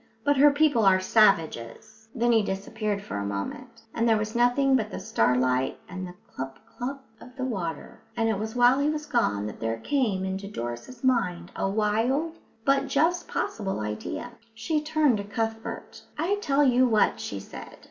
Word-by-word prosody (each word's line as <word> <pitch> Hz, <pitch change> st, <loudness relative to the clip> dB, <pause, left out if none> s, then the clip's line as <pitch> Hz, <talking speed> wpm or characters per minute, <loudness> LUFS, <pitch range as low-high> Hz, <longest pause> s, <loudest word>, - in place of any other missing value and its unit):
"But 285 Hz, +2 st, +2 dB
her 290 Hz, +2 st, +8 dB
people 285 Hz, -5 st, +3 dB
are 190 Hz, -1 st, +5 dB
savages." 200 Hz, -, +1 dB
Then 240 Hz, 0 st, +2 dB
he 225 Hz, -1 st, +5 dB
disappeared 205 Hz, +1 st, -3 dB
for 105 Hz, -, -5 dB
a 100 Hz, -, -2 dB
moment, 100 Hz, -, -5 dB
and 230 Hz, 0 st, +1 dB
there 220 Hz, -, +4 dB
was 215 Hz, +1 st, -3 dB
nothing 245 Hz, +3 st, +3 dB
but 220 Hz, -4 st, 0 dB
the -, -, -6 dB
starlight 125 Hz, +2 st, +1 dB
and 185 Hz, 0 st, -6 dB
the 180 Hz, -, -11 dB
clup, 135 Hz, 0 st, -6 dB
clup 270 Hz, +3 st, -6 dB, 0.2 s
of 250 Hz, -, -14 dB
the 260 Hz, -1 st, -3 dB
water; 175 Hz, -, -5 dB, 0.2 s
and 225 Hz, -1 st, +2 dB
it 220 Hz, -3 st, 0 dB
was 220 Hz, +2 st, -4 dB
while 245 Hz, +2 st, +5 dB
he 285 Hz, +1 st, +2 dB
was 305 Hz, 0 st, -3 dB
gone 230 Hz, -, 0 dB
that 105 Hz, -, -7 dB
there 115 Hz, 0 st, -2 dB
came 205 Hz, -, 0 dB
into 190 Hz, +1 st, -4 dB
Doris's 120 Hz, -, -6 dB
mind 180 Hz, -9 st, +1 dB
a 195 Hz, -, -1 dB
wild 230 Hz, +11 st, 0 dB, 0.3 s
but 275 Hz, 0 st, +3 dB
just 340 Hz, +6 st, +1 dB
possible 195 Hz, -, -2 dB
idea. 105 Hz, -, -4 dB, 0.2 s
She 300 Hz, +7 st, -1 dB
turned 300 Hz, -5 st, +2 dB
to 200 Hz, -, -4 dB
Cuthbert. 225 Hz, +1 st, -4 dB, 0.2 s
"I 355 Hz, +7 st, 0 dB
tell 285 Hz, -4 st, +2 dB
you 255 Hz, -1 st, +4 dB
what," 220 Hz, -3 st, +2 dB
she 100 Hz, -, -5 dB
said. 95 Hz, -, -10 dB
225 Hz, 180 wpm, -26 LUFS, 185-265 Hz, 0.3 s, her